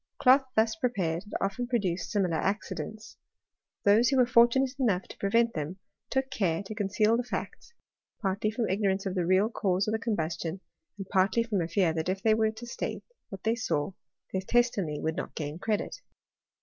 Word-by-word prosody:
Cloth 265 +1 +5
thus 220 0 +3
prepared 195 -7 -1
had 205 - -9
often 200 +5 -2
produced 195 -8 -1
similar 185 -6 +1
accidents. 210 +2 -4 0.7
Those 215 +4 +5
who 270 - +2
were 250 - +6
fortunate 250 +2 +4
enough 200 -8 +2
to - - -12
prevent 230 +4 +2
them, 155 +4 -4 0.3
took 265 0 -1
care 190 -7 0
to 200 - -7
conceal 210 +1 +2
the 245 - -1
facts, 470 - -6 0.4
partly 200 +1 0
from 225 +1 -1
ignorance 195 0 0
of 190 - -1
the 180 -3 -1
real 190 +4 +4
cause 190 -3 0
of - - +1
the 220 - 0
combustion, 175 -5 -2 0.4
and 195 -2 -6
partly 195 +4 +3
from 210 -5 -1
a 165 - -1
fear 170 -1 +2
that 160 +2 -2
if 190 +2 -2
they 220 - +5
were 220 0 +2
to 220 +2 -8
state 240 - -4 0.3
what 195 -2 -9
they 225 - +2
saw, 175 -9 -1 0.4
their 190 - 0
testimony 195 -8 +1
would 160 0 -2
not - - -5
gain 150 +1 -4
credit. 215 - -2
205 Hz, 190 wpm, -29 LUFS, 185-230 Hz, 0.7 s, were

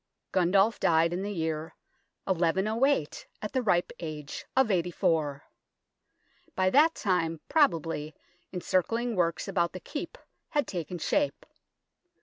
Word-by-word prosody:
Gundulf 195 +4 +3
died 165 +1 +3
in 180 - -2
the 205 +1 -3
year 160 -3 -3 0.5
1108 190 - +1
at 210 - -6
the 260 - +1
ripe 180 -6 +1
age 150 -3 -6
of 265 -5 +4
eighty 180 -2 +1
four. 150 -4 0 1.1
By 185 0 +2
that 310 +4 +5
time, 165 -5 0
probably, 165 - +1 0.4
encircling 225 +6 0
works 170 0 0
about 175 -3 0
the 185 - -6
Keep 290 - -6 0.3
had 290 -2 +1
taken 175 -1 -4
shape. 290 - 0
180 Hz, 125 wpm, -29 LUFS, 165-220 Hz, 1.1 s, that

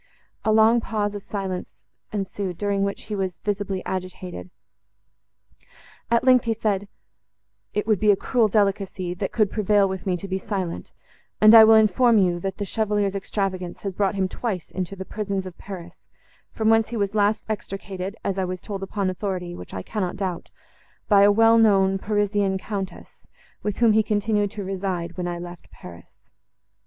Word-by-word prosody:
A 220 - +2
long 220 +2 +5
pause 210 -2 -2
of 205 - -6
silence 190 -3 -4 0.4
ensued, 195 -3 -4
during 200 -1 0
which 200 0 -2
he 210 - -5
was 190 -3 -2
visibly 200 -2 -3
agitated; 185 - -5 1.6
at 235 0 +3
length, 255 -2 +5
he 225 -1 0
said, 205 -2 -1 0.9
"It 210 - 0
would 215 -4 +2
be 210 - +3
a 205 - +7
cruel 230 +3 +1
delicacy, 195 -3 0
that 190 +2 -4
could 215 -4 +1
prevail 205 -1 +3
with 190 0 -5
me 180 -1 +1
to 195 - -7
be 190 0 -2
silent—and 200 +2 -1
I 225 -1 +11
will 220 0 +7
inform 220 +2 +4
you, 180 -3 +2
that 190 +1 -4
the 205 - -3
Chevalier's 205 -2 0
extravagance 190 -3 -3
has 195 -2 -4
brought 200 +1 0
him 190 -1 +1
twice 190 -3 -4
into 185 +1 -4
the 190 0 -7
prisons 200 -2 -3
of 185 -2 -8
Paris, 185 -4 -9 0.5
from 220 0 +1
whence 225 0 +3
he 235 - -4
was 200 -1 -1
last 210 0 +1
extricated, 195 -2 -5
as 195 -1 -1
I - - +1
was 185 0 -4
told 200 -1 -6
upon 195 0 -2
authority, 180 -1 -4
which 90 - -9
I 95 - -4
cannot 195 -4 -3
doubt, 190 -3 -4 0.6
by 200 -2 +6
a 200 +1 +7
well 225 +2 +5
known 195 -3 +4
Parisian 205 -1 0
Countess, 195 -1 -7 0.3
with 210 -1 -3
whom 235 -2 +5
he 220 +1 +4
continued 210 -1 0
to 205 - -5
reside, 185 -3 -3
when 180 -1 -3
I 175 0 -3
left 175 0 -10
Paris." 85 -1 -14
200 Hz, 175 wpm, -24 LUFS, 185-210 Hz, 1.6 s, I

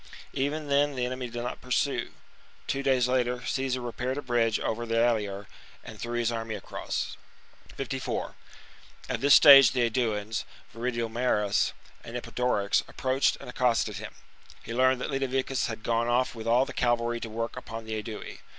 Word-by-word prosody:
Even 145 +3 -2
then 145 0 +2
the 125 -1 -1
enemy 125 0 -4
did 120 0 -5
not 120 - -5
pursue. 130 +2 0 0.6
Two 135 - -1
days 130 -3 +2
later 125 -1 0
Caesar 130 -1 -1
repaired 125 +2 -3
a 145 - -4
bridge 115 -3 +1
over 115 +2 -2
the 115 0 0
Allier 105 -4 +1 0.4
and 110 -3 -10
threw 120 +3 -3
his 120 -1 +1
army 115 -1 -3
across. 100 - -4 0.5
He - - -16
permits! - - -23
54 135 -1 -3 0.7
At - - -2
this 140 +1 +7
Stage 135 -4 +9
the 125 - +1
Aeduans, 110 -3 0 0.3
Viridomarus 120 +1 -2
arfd 115 -3 0
virSU - - +2 0.3
and 115 +1 -6
Eporedorix, 120 -4 0
approached 130 +1 +1
and - - -10
accosted 120 -5 +1
him. 110 +2 -8
S^keeplhe^ - - -23
He - - -7
leamcd 130 +2 +3
that 125 - -4
Litaviccus 135 -1 0
had 110 -1 -6
gone 115 0 +1
off 125 +2 +1
with 115 -1 -7
all 120 +3 +4
steady, 140 - -6
but 120 -1 +4
thc - - -12
cavaky 120 0 -2
to 115 - -5
work 115 +1 -4
upon 115 0 -7
the 110 -1 -3
Aedui. 110 0 -8
120 Hz, 185 wpm, -28 LUFS, 115-130 Hz, 0.7 s, Stage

